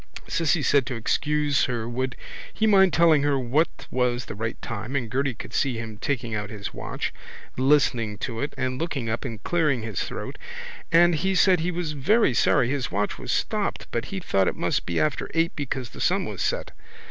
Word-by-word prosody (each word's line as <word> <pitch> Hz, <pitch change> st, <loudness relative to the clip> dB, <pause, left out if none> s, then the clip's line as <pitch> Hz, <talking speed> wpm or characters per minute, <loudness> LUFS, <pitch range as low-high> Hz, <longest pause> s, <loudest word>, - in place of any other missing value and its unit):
Cissy 165 Hz, -1 st, +1 dB
said 140 Hz, -2 st, +3 dB
to 130 Hz, -, -3 dB
excuse 145 Hz, +5 st, +1 dB
her 115 Hz, -2 st, -2 dB
would 125 Hz, +1 st, -2 dB, 0.4 s
he 220 Hz, -, 0 dB
mind 190 Hz, -3 st, +6 dB
please -, -, -1 dB
telling 165 Hz, -3 st, +6 dB
her 145 Hz, -1 st, +2 dB
what 135 Hz, +6 st, 0 dB
was 125 Hz, -1 st, 0 dB
the -, -, -6 dB
right 110 Hz, +2 st, -4 dB
time 115 Hz, +4 st, -5 dB
and 120 Hz, -5 st, -2 dB
Gerty 135 Hz, 0 st, 0 dB
could -, -, -9 dB
see 130 Hz, -5 st, +1 dB
him 110 Hz, -2 st, -6 dB
taking 120 Hz, -5 st, -2 dB
out 105 Hz, -1 st, -3 dB
his 105 Hz, -2 st, -6 dB
watch, -, -, -4 dB, 0.4 s
listening 130 Hz, -6 st, +2 dB
to 115 Hz, +3 st, -4 dB
it 140 Hz, -, -3 dB
and 130 Hz, -1 st, -2 dB
looking 140 Hz, -9 st, -2 dB
up 110 Hz, -, -3 dB
and 115 Hz, -4 st, -6 dB
clearing 150 Hz, -9 st, +1 dB
his 110 Hz, -4 st, -3 dB
throat -, -, -6 dB, 0.5 s
and 175 Hz, +1 st, +6 dB
he 190 Hz, +5 st, 0 dB
said 185 Hz, -1 st, +5 dB
he 170 Hz, +3 st, -1 dB
was 175 Hz, -3 st, -2 dB
very 150 Hz, -, +3 dB
sorry 125 Hz, +1 st, +3 dB
his 135 Hz, -3 st, -1 dB
watch 105 Hz, +1 st, -1 dB
was -, -, -4 dB
stopped -, -, -1 dB
but 115 Hz, -, -1 dB
he 195 Hz, -, -4 dB
thought 95 Hz, -, +1 dB
it -, -, 0 dB
must -, -, -1 dB
be 85 Hz, -1 st, 0 dB
after 155 Hz, -, 0 dB
eight 165 Hz, +1 st, +1 dB
because 130 Hz, -4 st, -4 dB
the -, -, -9 dB
sun -, -, +2 dB
was -, -, -5 dB
set. -, -, -1 dB
130 Hz, 205 wpm, -25 LUFS, 115-155 Hz, 0.5 s, mind